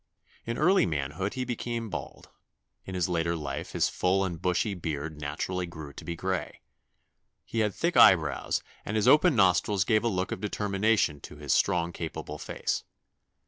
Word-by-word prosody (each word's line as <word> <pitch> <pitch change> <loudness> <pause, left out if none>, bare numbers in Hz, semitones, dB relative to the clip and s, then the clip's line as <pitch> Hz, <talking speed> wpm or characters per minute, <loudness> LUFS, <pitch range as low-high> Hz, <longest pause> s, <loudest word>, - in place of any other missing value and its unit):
In 115 0 -2
early 185 +5 +4
manhood 80 - -2
he 130 -1 -2
became 120 -2 -4
bald; 85 - -7 0.5
in 95 - -6
his 90 -1 +1
latter 85 -1 0
life 75 -4 -5
his - - +2
full 95 +2 +1
and 85 -4 -5
bushy 90 +3 +1
beard 80 -3 -4
naturally 90 +5 -3
grew 80 -4 -9
to - - -10
be 85 - -4
gray. 95 +1 -3 0.8
He 115 - -3
had 105 -2 +1
thick 170 +1 0
eyebrows, 80 -8 +5 0.2
and 105 - -4
his 110 - +2
open 155 0 +6
nostrils 95 -1 +3
gave 110 -2 +3
a - - +2
look 95 -4 -1
of - - -4
determination 105 -5 +1
to - - -10
his 75 -2 -1
strong 85 -1 +2
capable 80 -2 -6
face. - - -2
90 Hz, 170 wpm, -28 LUFS, 80-105 Hz, 0.8 s, open